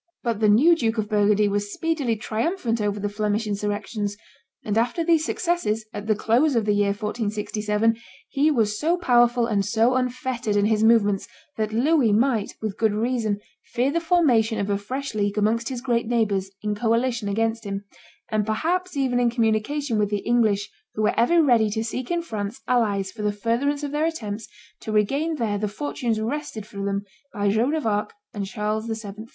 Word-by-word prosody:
But 230 -3 -1
the 215 -1 +4
new 285 +12 +6
Duke 230 -7 -1
of 215 -1 -1
Burgundy 210 0 +3
was 205 0 -1
speedily 300 -7 -1
triumphant 230 - -1
over 205 0 -1
the 205 - -1
Flemish 210 +1 -1
insurrections; 205 0 -3 0.5
and 210 - -1
after 240 +9 +1
these 325 -2 +3
successes, 325 - -1
at 205 0 -6
the 215 - +3
close 245 +7 +2
of 225 -2 +2
the 210 - +2
year 205 0 +2
1467, 210 +1 -1 0.3
he 290 +3 +2
was 215 -7 +1
so 335 +4 +2
powerful 240 -6 +3
and 210 -4 +1
so 225 +4 +2
unfettered 255 -3 -1
in 205 0 +3
his 215 0 +2
movements, 205 -3 +3 0.3
that 215 -1 -2
Louis 255 +1 +3
might, 225 -1 +1
with 215 -3 -3
good 220 -2 +2
reason, 220 -2 -1 0.3
fear 255 +3 +1
the 335 - +1
formation 270 -11 +3
of 205 0 -1
a 200 - +1
fresh 260 +7 -5
league 205 -1 -1
amongst 225 +2 +1
his 255 -2 -4
great 235 -3 0
neighbors 210 -5 0
in 210 -1 0
coalition 230 0 0
against 225 +2 0
him, 200 -1 -4 0.5
and 215 -1 +1
perhaps 330 - -1
even 255 -3 +1
in 240 -1 +3
communication 230 +2 0
with 205 -1 +1
the 205 -1 -2
English, 220 -4 +2 0.3
who 215 - -1
were 215 - +3
ever 325 +9 +4
ready 235 -6 +4
to 220 +2 -2
seek 240 +2 -4
in 345 -1 0
France 215 -4 -5
allies 205 -6 +1
for 215 - -8
the 210 0 +1
furtherance 240 +8 -1
of 285 - -3
their 300 +2 +1
attempts 225 -10 -4 0.3
to 220 - -6
regain 275 +10 +1
there 220 -7 -1
the 210 - -1
fortunes 235 0 -2
wrested 230 -2 -4
from 200 -1 -6
them 200 0 -1 0.3
by 205 -2 0
Joan 235 +9 +2
of 310 - -2
Arc 210 - 0 0.2
and 200 -3 -4
Charles 215 +1 -2
VII. 220 -1 -6
225 Hz, 190 wpm, -24 LUFS, 210-255 Hz, 0.5 s, new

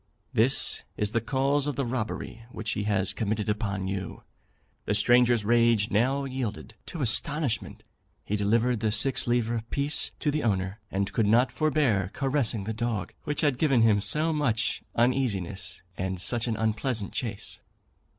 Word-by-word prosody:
This 120 +5 +2 0.2
is 105 -1 0
the 115 0 0
cause 135 +4 0
of 145 - -2
the 135 0 -1
robbery 115 -1 -4
which 110 -2 -4
he 105 - -2
has 100 -2 0
committed 110 -1 -2
upon 100 -3 -2
you.' 95 0 -5 0.6
The 105 - +1
stranger's 120 0 +4
rage 115 -2 +3
now 130 +6 +2
yielded 130 -5 -5
to 160 -5 -4
astonishment; 140 0 0 0.4
he 105 - -1
delivered 115 +4 +1
the 110 -1 0
six 120 +6 +3
livre 120 -1 +1
piece 145 +2 +1
to 150 - 0
the 155 +1 -1
owner, 95 -2 -1
and 95 0 -2
could 110 -4 +2
not 120 +5 +4
forbear 135 - +1
caressing 135 -6 0
the 110 +3 -3
dog 110 -5 -3
which 150 - -2
had 145 -4 +1
given 135 -7 +3
him 105 -3 +4
so 150 +11 +2
much 120 -7 0
uneasiness, 100 -7 0
and 95 0 -3
such 120 +5 0
an 110 -2 -1
unpleasant 110 0 -1
chase." 110 -7 -4
115 Hz, 160 wpm, -27 LUFS, 105-130 Hz, 0.6 s, stranger's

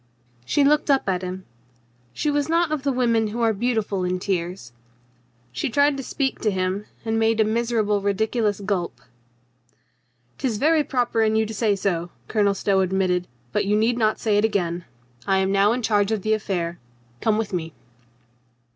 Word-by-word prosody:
She 285 - +2
looked 295 +2 +3
up 270 -5 +3
at 185 -2 0
him. 185 0 -6 0.7
She 300 - -1
was 290 +1 0
not 335 -1 +2
of 310 -3 -1
the 280 0 0
women 235 -3 +2
who 225 +3 -4
are 225 -1 +3
beautiful 215 -3 -1
in 180 0 0
tears. 180 - -3 0.8
She 125 - -2
tried 285 +3 +3
to 275 - -4
speak 270 0 -2
to 215 - +1
him, 190 +1 -1 0.2
and 225 0 0
made 225 0 +2
a - - +6
miserable 220 -2 0
ridiculous 210 +1 0
gulp. 195 -4 -2 0.7
" 120 0 -42
'Tis 250 -6 -1
very 310 +5 +3
proper 245 -5 0
in 220 0 +2
you 220 0 +2
to 220 - -6
say 210 -1 +1
so," 175 -3 -1 0.2
Colonel 205 -3 +2
Stow 195 0 +1
admitted. 185 -1 +1 0.2
"But - - 0
you 205 +1 +2
need 230 +3 +2
not 215 -1 +1
say 210 -2 +2
it - - +1
again. 180 -5 0 0.4
I 195 -1 +3
am 190 0 +1
now 200 +1 +4
in 245 +1 -1
charge 205 -1 +2
of 215 -4 -1
the 215 - +2
affair. 175 -5 -2 0.4
Come 215 -1 +2
with 220 -2 -3
me." 165 -3 -3
210 Hz, 185 wpm, -23 LUFS, 190-235 Hz, 0.8 s, a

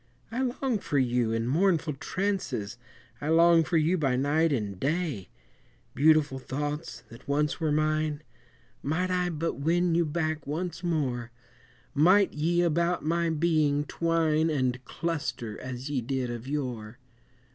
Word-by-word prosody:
I 245 +3 -2
long 255 -2 -1
for 150 -6 -2
you 120 -3 +1
in 115 0 -1
mournful 165 +1 +2
trances, 160 - -2 0.5
I 145 - -2
long 165 0 +6
for 165 +1 0
you 165 +3 +2
by 135 -4 +1
night 150 +5 +2
and 105 -8 -2
day; 145 - -2 0.6
Beautiful 150 -2 +3
thoughts 145 -1 -4
that 115 - -14
once 150 +2 0
were 160 -2 0
mine, 155 0 0 0.6
Might 180 +6 -1
I 180 -1 +1
but 165 -2 -3
win 170 +4 +2
you 170 -1 +2
back 155 -1 -2
once 175 +4 -4
more, 130 -9 -1 0.6
Might 185 +7 +4
ye 170 +3 +1
about 170 0 +1
my 170 +1 +1
being 155 -3 +2
twine 165 -1 +1
And 130 -4 -1
cluster 125 -10 -4
as 130 +2 -6
ye 135 -3 0
did 130 0 -2
of 120 +1 -7
yore! 125 -6 -4
155 Hz, 145 wpm, -28 LUFS, 130-170 Hz, 0.6 s, long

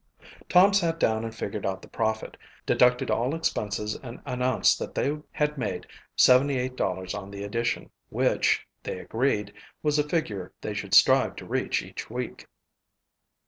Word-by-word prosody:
Tom 190 +3 +6
sat 170 -4 +1
down 110 -4 +2
and 115 0 -5
figured 110 -2 -4
out 95 -1 -2
the - - -11
profit, 110 0 -2 0.3
deducted 125 0 +3
all 125 +6 +1
expenses, 105 -9 -1
and 120 -2 -8
announced 125 0 +2
that - - -6
they 145 +2 +1 0.2
had 150 -1 -1
made 100 -6 -3 0.3
$78 125 -8 +3
on 100 -1 -6
the 100 0 -7
edition, 115 +4 -2 0.2
which, - - +2 0.2
they - - -5
agreed, 110 -4 -1 0.3
was 150 -1 +2
a 150 0 0
figure 105 - -2
they 105 - -4
should 100 -1 -1
strive 130 +5 +6
to - - -9
reach - - -1
each - - -8
week. - - -5
120 Hz, 150 wpm, -27 LUFS, 105-140 Hz, 0.3 s, Tom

